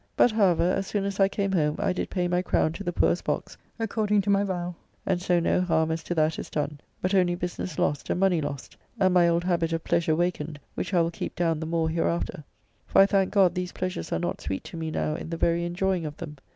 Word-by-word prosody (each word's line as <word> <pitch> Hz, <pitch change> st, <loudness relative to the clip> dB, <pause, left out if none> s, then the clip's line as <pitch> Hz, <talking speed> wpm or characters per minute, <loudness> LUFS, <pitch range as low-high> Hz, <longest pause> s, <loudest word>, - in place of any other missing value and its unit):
But, 245 Hz, -, +5 dB
however, 195 Hz, -6 st, +3 dB
as 190 Hz, +2 st, +1 dB
soon 200 Hz, -2 st, -1 dB
as 200 Hz, 0 st, -3 dB
I 195 Hz, -, +6 dB
came 195 Hz, 0 st, -1 dB
home 150 Hz, -5 st, +1 dB
I -, -, 0 dB
did -, -, -3 dB
pay 180 Hz, -2 st, 0 dB
my 180 Hz, 0 st, +1 dB
crown 160 Hz, -3 st, +1 dB
to 200 Hz, -, -6 dB
the 175 Hz, -, -1 dB
poor's 175 Hz, -, +2 dB
box, -, -, -3 dB, 0.2 s
according 215 Hz, -2 st, +1 dB
to 200 Hz, +1 st, 0 dB
my 200 Hz, 0 st, +3 dB
vow, 180 Hz, -2 st, -3 dB, 0.3 s
and 185 Hz, -2 st, 0 dB
so 180 Hz, -1 st, +2 dB
no 170 Hz, -, +2 dB
harm 160 Hz, -3 st, +1 dB
as 160 Hz, 0 st, -2 dB
to 175 Hz, -, -2 dB
that 155 Hz, 0 st, +1 dB
is -, -, -6 dB
done, 150 Hz, -1 st, -3 dB, 0.2 s
but 185 Hz, +2 st, 0 dB
only 180 Hz, -2 st, +3 dB
business 175 Hz, -2 st, -4 dB
lost 145 Hz, -1 st, 0 dB
and -, -, 0 dB
money 185 Hz, -4 st, +3 dB
lost, 145 Hz, -2 st, -6 dB, 0.2 s
and 185 Hz, -2 st, +4 dB
my 175 Hz, -1 st, +5 dB
old 170 Hz, 0 st, +2 dB
habit 170 Hz, -2 st, 0 dB
of 165 Hz, -, -2 dB
pleasure 165 Hz, -2 st, +1 dB
wakened, 160 Hz, -3 st, -2 dB
which -, -, -4 dB
I 180 Hz, -3 st, +4 dB
will 165 Hz, 0 st, 0 dB
keep -, -, -5 dB
down 165 Hz, -3 st, +1 dB
the 160 Hz, -, -4 dB
more 165 Hz, -1 st, 0 dB
hereafter, 165 Hz, -1 st, -1 dB, 0.4 s
for -, -, +3 dB
I 195 Hz, -, +9 dB
thank 195 Hz, -1 st, +2 dB
God 190 Hz, -4 st, +4 dB
these 180 Hz, 0 st, -3 dB
pleasures 185 Hz, -, -4 dB
are -, -, +1 dB
not 85 Hz, +1 st, -3 dB
sweet 95 Hz, -, -3 dB
to -, -, -10 dB
me 160 Hz, -1 st, -3 dB
now 155 Hz, 0 st, -1 dB
in 160 Hz, -, -6 dB
the 165 Hz, -, -3 dB
very 170 Hz, +1 st, +1 dB
enjoying 175 Hz, -1 st, -1 dB
of 150 Hz, -, -8 dB
them. 150 Hz, -4 st, -8 dB
175 Hz, 255 wpm, -26 LUFS, 160-185 Hz, 0.4 s, I